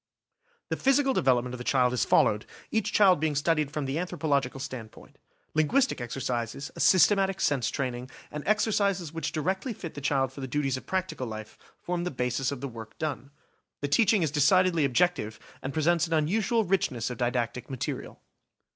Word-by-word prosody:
The - - -1
physical 270 0 +3
development 125 - +2
of 125 - -6
the - - -5
children 125 -1 +2
is 125 - +1
followed, 105 +1 +3 0.2
each 220 -3 0
child 190 -6 +5
being 155 -1 0
studied 150 0 +1
from 150 -1 -3
the 135 +4 -2
anthropological 145 -7 -1
standpoint. 120 -4 -9 0.3
Linguistic 190 - +2
exercises, 120 +1 -3
a - - -9
systematic 195 0 +4
sense 140 -8 +1
training, 125 -2 -3 0.2
and 150 - -5
exercises 200 -6 +1
which 165 -2 -3
directly 190 - -2
fit 170 -5 -8
the 145 - -7
child 135 -2 +1
for 140 - -8
the 130 - -4
duties 135 0 0
of 130 - -8
practical 185 -8 -2
life, 110 -1 -7 0.2
form 175 0 -3
the 180 - -1
basis 125 -2 -1
of 140 -3 -5
the 140 - -3
work 115 -3 -10
done. 150 -3 -4 0.5
The 145 - -1
teach 195 +10 +4
ing 210 -6 +3
is 155 - 0
decidedly 165 +2 +4
objective, 135 -6 +1 0.2
and 135 - -4
presents 165 +2 +2
an 165 - -3
unusual 205 +9 +2
richness 130 -11 0
of 125 - -7
didactic 120 +1 -1
material. 130 -2 -5
145 Hz, 180 wpm, -28 LUFS, 125-180 Hz, 0.5 s, child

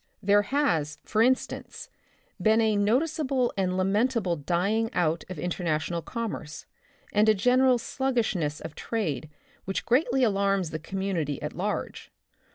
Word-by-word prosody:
There 205 +1 +5
has, 200 - 0
for 215 - +1
in 255 +3 +6
stance, - - -9 0.5
been 220 +1 +4
a 220 -2 +3
noticeable 260 +4 +1
and 185 -1 0
lamentable 200 0 +1
dying 185 +9 0
out 165 -2 +1
of 185 - -6
international 170 -1 -2
commerce 195 -9 -5 0.5
and 210 +1 +4
a 215 - +5
general 250 +4 +4
sluggishness 230 - -1
of 160 - -7
trade 160 - -3 0.4
which 195 - -3
greatly 255 +1 +2
alarms 195 -5 +1
the 155 - -4
community 170 -5 -2
at - - -4
large. - - -4
200 Hz, 135 wpm, -27 LUFS, 170-235 Hz, 0.5 s, in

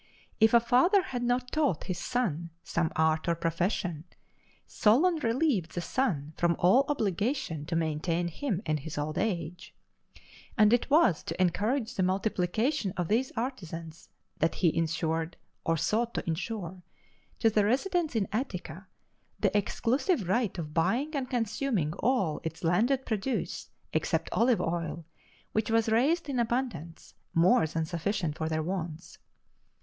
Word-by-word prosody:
If 220 +1 +5
a - - +9
father 265 - +4
had 245 -6 -4
not 245 +1 0
taught 290 - +1
his 185 - -4
son 175 -10 -1
some 170 -1 -1
art 160 0 +2
or 170 - +2
profession, 165 -1 -1 0.6
Solon 310 +12 +3
relieved 235 - 0
the 175 - -1
son 160 - -1
from 170 -1 +2
all 220 +11 +5
obligation 210 - -1
to 170 - -2
maintain 165 +2 0
him 200 - -3
in 155 - +1
his 155 +2 -7
old 150 +1 -2
age. 180 -3 -3 0.8
And 215 0 +6
it 240 - +2
was 290 - +4
to 165 - -5
encourage 215 +7 +1
the - - -1
multiplication 195 - 0
of 175 -2 -1
these 245 +5 +1
artisans 170 - -5 0.3
that 165 - +1
he 170 -4 +2
insured, 160 0 -1 0.3
or 165 0 +1
sought 230 +8 0
to - - -2
insure, 180 +1 -4 0.6
to 225 - +3
the 210 -1 +3
residents 310 - 0
in 210 -3 +1
Attica, 190 - -4 0.5
the - - +1
exclusive 235 - +1
right 215 0 0
of 155 -3 -5
buying 255 - +1
and 265 -3 -2
consuming 225 - -1
all 215 - +1
its 160 - -6
landed 235 +11 +2
produce 220 +4 -2 0.2
except - - 0
olive 235 0 +3
oil, 165 -1 -3 0.5
which 215 0 0
was 225 0 +2
raised 285 +9 +2
in 270 -3 -1
abundance, 235 - -3 0.2
more 165 -1 +5
than 160 +1 -2
sufficient 170 -1 -2
for 160 0 -2
their 155 0 -1
wants. 170 -1 -5
195 Hz, 145 wpm, -29 LUFS, 165-245 Hz, 0.8 s, a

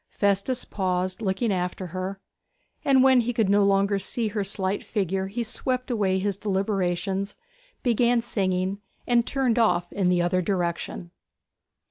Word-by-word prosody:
Festus 200 +5 0
paused, 185 -1 -2
looking 200 +2 0
after 180 +1 -2
her; 190 +1 -4 0.6
and 265 -2 +5
when 260 -2 +6
he 240 +1 -1
could 225 -4 +1
no 200 0 +4
longer 200 0 +2
see 220 +3 -1
her 205 -1 -2
slight 195 0 -1
figure 190 -2 -1
he 230 +5 -3
swept 255 +2 -2
away 200 -5 +1
his 195 0 -1
deliberations, 195 -1 -1 0.5
began 240 0 +3
singing, 190 -4 -1 0.3
and 240 -1 +2
turned 255 -4 +1
off 175 -6 +2
in 190 -3 +1
the 180 -1 +3
other 175 +1 +1
direction. 175 -2 -2
200 Hz, 145 wpm, -25 LUFS, 185-230 Hz, 0.6 s, when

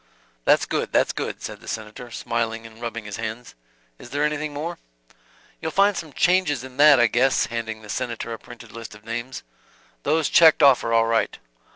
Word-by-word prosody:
"That's - - +4
good, - - -2
that's - - +2
good," - - -5
said - - -7
the - - -15
Senator; 110 +3 -6
smiling, 115 -1 -3
and 115 +1 -13
rubbing 115 -2 -5
his 105 -1 -6
hands. 115 +2 -6 0.5
"Is - - -11
there 145 +3 -1
anything 150 0 -1
more?" 160 +4 -5 0.8
"You'll 160 - -2
find 200 +3 +3
some 160 -3 -6
changes 175 -6 +2
in 130 -1 -11
that 145 -2 +7
I 120 - +6
guess," 125 +3 +2
handing 110 -1 -5
the - - -11
Senator 115 0 -4
a 115 - -7
printed 120 -2 -13
list 115 -1 -9
of 105 0 -17
names. 120 +3 -5 0.6
"Those 155 +1 +1
checked 160 -2 +6
off 135 -3 +6
are 115 - -2
all 115 0 +4
right." 115 0 0
120 Hz, 195 wpm, -23 LUFS, 115-145 Hz, 0.8 s, that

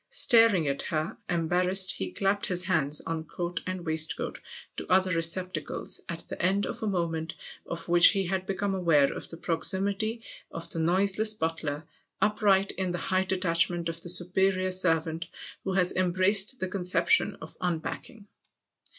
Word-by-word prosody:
" - - -52 0.2
Staring 225 -9 +5
at 140 0 -1
her, 155 0 -3
embarrassed, 180 +3 +2
he 95 -1 -4
clapped 195 - 0
his 180 -1 +1
hands, 155 -5 +1
on 165 -1 -4
coat 175 +2 -4
and 185 -2 -5
waistcoat, 160 0 0 0.4
to - - -6
other 185 0 +3
receptacles; 165 -1 0
at 170 0 -4
the - - -7
end 195 +3 +1
of - - -6
a 220 - -2
moment 165 -4 -2 0.3
of 170 -1 -6
which 175 0 +7
he 195 -2 +2
had 190 +1 -3
become 195 0 -2
aware 165 -7 +2
of - - -7
the 165 - -7
proximity 200 +7 -1 0.3
of 165 0 -7
the 165 - -3
noiseless 195 +6 +2
butler, 160 -4 -3 0.3
upright 205 -2 +2
in 190 -1 -3
the 175 - -3
high 185 +2 0
detachment 175 -2 0
of 165 0 -7
the 175 - -6
superior 185 +1 +1
servant 165 -3 +1 0.4
who 190 - -3
has 180 -1 +3
embraced 190 +6 +2
the 185 - -2
conception 185 - +1
of - - -12
unpacking. 180 +5 -4
180 Hz, 160 wpm, -27 LUFS, 165-190 Hz, 0.4 s, which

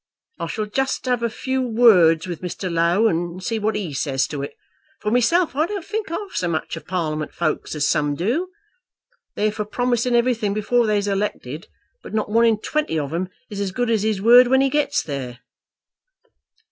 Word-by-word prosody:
I - - -3
shall 215 - -3
just 265 +6 -2
have 250 -2 0
a 235 - 0
few 260 +4 -2
words 210 -9 +5
with 175 -4 -6
Mr. 180 0 -4
Low, 170 +6 +3
and 175 -1 -2
see 225 +2 -1
what 215 +1 0
he 190 -8 -3
says 135 -1 0
to 145 -2 -4
it. 140 - -6 0.4
For 210 - -2
myself 280 +7 +2
I 310 +3 +2
don't 400 -3 -5
think 425 -1 -3
half 385 +4 -5
so 180 - -1
much 160 -1 -2
of 165 - -10
Parliament 155 -4 -3
folk 155 -3 -1
as 150 -1 +1
some 145 -2 +1
do. 245 - -1 0.9
They're 215 0 +1
for 210 0 -3
promising 245 +2 0
everything 235 -4 +1
before 230 +2 +1
they's 205 -1 +1
elected; 195 -6 -3 0.3
but - - -8
not 215 -1 -1
one 230 +2 +4
in 225 -2 +3
twenty 300 - -2
of 145 0 -3
'em 180 +2 -2 0.2
is 200 -1 -4
as 195 -2 -2
good 245 +4 -1
as 220 -3 +2
his 215 -2 0
word 240 +4 +7
when 265 +2 +4
he 270 -1 +2
gets 295 -1 +1
there." 130 -4 -6
210 Hz, 195 wpm, -22 LUFS, 170-245 Hz, 0.9 s, word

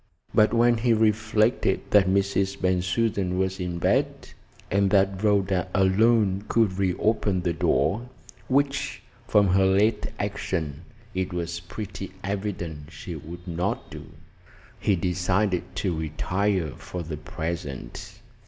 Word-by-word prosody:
But 110 - +5
when 120 +1 +4
he 115 0 +3
reflected 110 -1 +2
that 100 -2 +6
Mrs. 100 0 +1
Bensusan 95 +1 0
was 95 0 -1
in 90 -1 -3
bed, - - 0 0.4
and 100 0 +3
that 95 0 +2
Rhoda 100 -3 +2
alone 100 0 +3
could 105 -5 +2
reopen 95 0 +1
the 85 -1 0
door 105 - +1 0.4
which 140 +1 0 0.2
from 100 -2 +4
her 95 +1 +4
late 105 +3 +2
action 80 -3 -3 0.3
it 95 0 -2
was 85 -1 -3
pretty 95 +2 -7
evident 90 -7 -4
she 80 +3 -7
would 85 +4 -9
not 90 +3 -2
do - - -9 0.7
he 100 - +2
decided 90 +2 0
to 90 -1 -1
retire 85 +2 -1
for 90 +5 -7
the 75 -2 -5
present. 80 -3 -6
95 Hz, 125 wpm, -25 LUFS, 90-105 Hz, 0.7 s, that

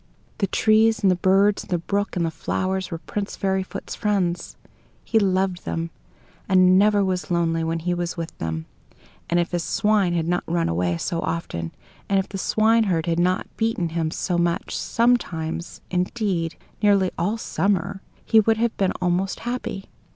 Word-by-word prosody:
The 195 - +1
trees 220 +2 +3
and 190 - +5
the - - +3
birds, 195 +3 +3
and - - -17
the 180 - +1
brook 200 +5 -2
and 175 -2 +1
the 165 - -1
flowers 185 +3 -2
were 165 - -4
Prince 200 +4 -4
Fairyfoot's 190 -1 -2
friends. 190 -5 -1 0.5
He 225 - +2
loved 190 -2 +1
them, 165 0 -3 0.6
and 185 0 +6
never 205 -1 +4
was 185 -1 -1
very 175 -2 +1
lonely 165 -1 0
when 165 +1 -1
he 175 +2 -1
was 175 0 -3
with 165 -1 -5
them; 80 0 -3 0.6
and 175 - +2
if 175 - -1
his 175 -1 -1
swine 210 -4 +2
had 165 -1 0
not 175 +1 0
run 170 0 +1
away 85 +1 0
so 165 - -2
often, 85 - -3 0.4
and 200 - +3
if 190 - 0
the 195 - -6
swineherd 215 -6 +2
had 170 -1 0
not 180 +1 +1
beaten 220 -7 0
him 165 -1 -1
so 175 +1 -1
much, 170 0 -1
sometimes 175 -9 0
indeed, 180 -2 -1 0.3
nearly 200 -3 +4
all 200 +7 0
summer 195 -3 -1 0.2
he 225 - +5
would 220 +1 +3
have 235 0 0
been 195 -2 +1
almost 180 +2 0
happy. 240 -5 -4
185 Hz, 175 wpm, -23 LUFS, 170-205 Hz, 0.6 s, and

